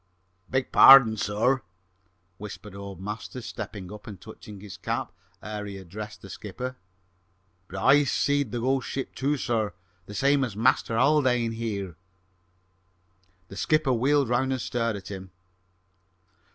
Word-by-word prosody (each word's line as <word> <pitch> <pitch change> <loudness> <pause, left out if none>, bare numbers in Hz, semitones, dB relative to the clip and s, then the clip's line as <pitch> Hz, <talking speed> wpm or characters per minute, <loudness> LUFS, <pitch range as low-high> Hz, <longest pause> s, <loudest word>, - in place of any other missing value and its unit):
"Beg 130 0 -1
pardon, 135 -5 +9
sir," 110 +6 +1 0.8
whispered 105 0 -9
old 100 -2 -8
Masters, 110 +4 -6
stepping 100 -2 -7
up 105 - -12
and 100 -5 -8
touching 105 0 -11
his 100 -4 -9
cap - - -3 0.3
ere 105 -1 -5
he 100 -1 -7
addressed 105 +4 -9
the 100 - -10
skipper, 125 +7 -6 0.9
"but 95 - -8
I 140 +8 +5
seed 140 -2 +1
the 120 - -2
ghost 130 0 0
ship, 135 - -4
too, 145 +2 0
sir, 115 -5 -1 0.3
the 105 - -8
same 140 +2 +3
as 110 -6 -4
Master 115 -1 +2
Haldane, 125 -4 +3
sir." 100 -6 -4 1.5
The 95 - -10
skipper 155 +2 +2
wheeled 135 +3 +2
round 130 +2 +1
and 130 - -1
stared 115 -2 -1
at 95 -2 -8
him. 95 -1 -7
115 Hz, 140 wpm, -26 LUFS, 100-130 Hz, 1.5 s, pardon